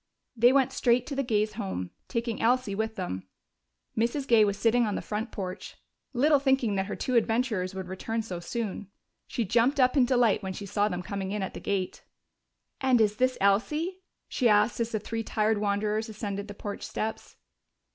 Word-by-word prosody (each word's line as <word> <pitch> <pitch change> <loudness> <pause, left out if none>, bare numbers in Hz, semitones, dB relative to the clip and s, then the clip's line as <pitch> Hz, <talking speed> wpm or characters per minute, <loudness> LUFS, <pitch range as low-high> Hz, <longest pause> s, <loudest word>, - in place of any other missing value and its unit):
They 240 +2 +6
went 270 -1 +3
straight 240 0 +2
to 280 - -5
the 275 - +1
Gays' 215 -4 0
home, 190 - -4 0.2
taking 230 -2 -2
Elsie 245 -2 +2
with 220 +2 -2
them. 95 - -4 0.7
Mrs. 240 +5 0
Gay 230 -2 +6
was 200 -1 +1
sitting 230 +2 +3
on 205 - -1
the - - -2
front 220 +3 -3
porch, 190 -1 -6 0.3
little 285 +3 +4
thinking 265 -5 +2
that 190 -1 -1
her - - -4
two 255 - -3
adventurers 225 -5 +1
would 190 -1 -5
return 225 +5 -3
so 185 -5 -5
soon. 205 +2 -4 0.4
She 235 - -2
jumped 240 +7 +2
up 255 +1 +4
in 265 -3 +5
delight 245 -4 +3
when 190 -1 -4
she 200 - -7
saw 205 +1 +1
them 180 -3 -3
coming 195 0 -4
in 205 -1 -2
at 190 - -4
the - - -6
gate. 195 -2 -2 0.8
"And 260 -2 +3
is 210 -1 +2
this 255 0 +2
Elsie?" 300 - +1 0.3
she 245 -3 +2
asked 210 +2 +3
as 230 0 -1
the 215 - -1
three 225 +2 -4
tired 215 -1 +1
wanderers 210 +2 0
ascended 205 -1 -4
the 205 - -8
porch 205 0 -6
steps. 220 +1 -4
220 Hz, 195 wpm, -28 LUFS, 200-245 Hz, 0.8 s, They